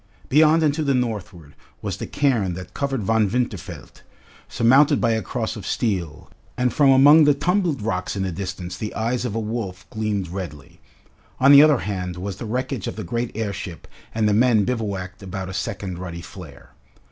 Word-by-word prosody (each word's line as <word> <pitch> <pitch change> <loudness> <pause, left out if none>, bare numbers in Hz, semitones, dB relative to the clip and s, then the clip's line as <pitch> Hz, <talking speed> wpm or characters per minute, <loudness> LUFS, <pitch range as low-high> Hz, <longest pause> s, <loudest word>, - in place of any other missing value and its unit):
Beyond 155 +3 +5
and 150 -2 +3
to 155 - -3
the 140 -2 +1
northward 105 - -4 0.3
was - - -3
the - - -6
cairn 115 -11 0
that 90 0 -9
covered 135 -5 -2
Von 110 0 +2
Winterfeld, 100 -8 -4 0.5
surmounted 130 +5 +4
by 115 - +2
a 110 0 0
cross - - -3
of - - -8
steel, 90 -10 -2 0.3
and 125 -1 +1
from 145 -2 +4
among 145 +4 +7
the 145 -1 +4
tumbled 170 - 0
rocks 90 -4 -2
in 95 - -2
the 95 - -2
distance 90 0 -5
the 105 +3 -6
eyes 115 +2 -1
of 115 -3 -3
a - - 0
wolf 105 -3 -5
gleamed 105 -4 -2
redly. 85 -6 -8 0.6
On 135 +2 +6
the 140 0 +10
other 150 -4 +5
hand 90 -3 -4
was 95 +1 -5
the 115 - -6
wreckage 125 -1 -3
of - - -4
the - - -5
great 115 +7 -2
airship 100 -5 -5 0.3
and 110 -1 +2
the 105 - +2
men 110 -2 +4
bivouacked 100 -6 -4
about 95 -1 -6
a - - -6
second 95 -2 -4
ruddy 85 -2 -6
flare. 80 -4 -12
105 Hz, 190 wpm, -22 LUFS, 95-125 Hz, 0.6 s, the